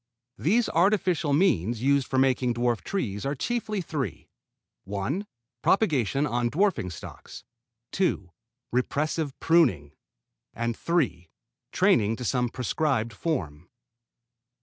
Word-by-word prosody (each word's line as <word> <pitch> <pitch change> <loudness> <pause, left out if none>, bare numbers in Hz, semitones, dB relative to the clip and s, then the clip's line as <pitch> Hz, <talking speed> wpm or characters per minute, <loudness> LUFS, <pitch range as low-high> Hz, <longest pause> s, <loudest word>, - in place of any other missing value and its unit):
These 220 +9 +2
artificial 180 -3 +2
means 120 - +2
used 140 -1 +3
for 130 - -1
making 130 -2 +2
dwarf 120 -1 0
trees 105 - -3
are 140 +2 -1
chiefly 215 - -2
three: 150 -6 -4 0.6
(1) 105 - -3 0.3
propagation 145 - +2
on 120 -3 0
dwarfing 160 - +1
stocks, 85 - -10 0.5
(2) 140 - 0 0.4
repressive 145 +3 -1
pruning, 125 - +3 0.6
and 115 0 -1
(3) 145 - -1 0.4
training 110 -1 +3
to 125 - -6
some 125 0 +1
prescribed 125 -2 -1
form. 90 - -3
130 Hz, 105 wpm, -26 LUFS, 115-165 Hz, 0.6 s, used